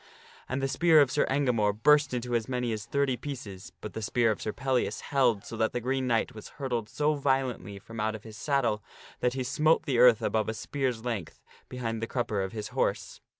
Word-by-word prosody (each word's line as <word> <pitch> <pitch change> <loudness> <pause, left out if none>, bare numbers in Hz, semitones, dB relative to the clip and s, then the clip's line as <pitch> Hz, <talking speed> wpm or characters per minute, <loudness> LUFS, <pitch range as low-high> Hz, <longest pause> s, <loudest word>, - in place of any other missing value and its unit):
And 135 +1 -2
the - - +2
spear 155 +4 +5
of 140 -3 +4
Sir 145 - +2
Engamore 125 -7 +2
burst 145 +6 +4
into 125 -1 -3
as 115 +1 0
many 125 -2 -1
gamore. - - -1
^ - - 0
s 110 0 -5
^i^y 140 -3 0
pieces, 110 -9 -7
but 105 - -7
the 110 - -5
spear 115 +2 +2
of 105 - -4
Sir 110 - -2
Pellias 130 +1 -1
held 125 -7 +1
so - - -7
that 110 0 +1
the 120 - -1
Green 130 +2 -1
Knight 115 -2 +1
was 110 - -9
hurtled 120 -6 -2
so 150 +4 +1
violently 130 -8 -1
from 115 +3 -10
out 110 +1 0
of 105 - -9
his 110 -1 -10
saddle 120 -4 0 0.4
that 125 - +1
he 130 - -1
smote 155 +5 +2
the 130 -4 +1
earth 120 -3 +6
above 110 0 0
a 110 - -3
spear's 125 -3 -2
length 105 -10 -4 0.3
behind 115 -3 -3
the 115 - -2
crupper 115 -6 -1
of 95 - -4
his 110 -2 -5
horse. - - -2
120 Hz, 230 wpm, -29 LUFS, 110-135 Hz, 0.4 s, earth